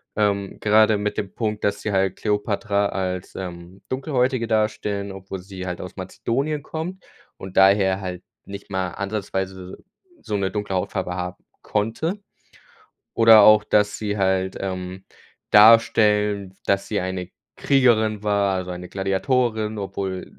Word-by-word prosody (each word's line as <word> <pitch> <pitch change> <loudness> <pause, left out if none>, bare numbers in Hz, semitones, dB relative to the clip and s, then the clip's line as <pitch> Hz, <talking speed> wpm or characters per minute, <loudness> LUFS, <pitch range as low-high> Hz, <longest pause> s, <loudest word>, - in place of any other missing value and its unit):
Ähm, 100 -2 0
gerade 110 0 +4
mit 105 0 -3
dem 100 -2 -4
Punkt, 105 -2 -3
dass 100 0 -1
sie 110 - -2
halt 95 -1 +1
Kleopatra 105 -1 0
als, 95 -1 -4
ähm, 90 0 -8
Dunkelhäutige 130 -3 0
darstellen, 105 -2 -1
obwohl 95 0 -7
sie 95 0 -8
halt 90 -1 -4
aus 90 - -9
Mazedonien 140 +10 -3
kommt 170 +5 -6 0.3
und 95 0 -9
daher 95 0 +5
halt 90 -1 -6 0.2
nicht 100 +1 -9
mal 95 -1 -1
ansatzweise 95 -2 -4 0.4
s - - -28
so 105 - -1
'ne 95 -1 -1
dunkle 105 -2 -3
Hautfarbe 90 -1 -2
haben 90 0 -5 0.2
konnte. 120 - -2 0.9
Oder 115 -1 +8
auch, 105 0 +7
dass 105 0 +1
sie 105 -1 -3
halt, 95 -1 0
ähm, 95 0 -5 0.5
darstellen, 105 -3 +5
dass 100 0 0
sie 105 - -1
eine 90 -1 -4 0.3
Kriegerin 110 -6 +2
war, 100 -2 +1
also 90 -1 -4
eine 90 0 -7
Gladiatorin, 110 +3 0
obwohl 95 -2 -4
100 Hz, 140 wpm, -22 LUFS, 95-110 Hz, 0.9 s, Oder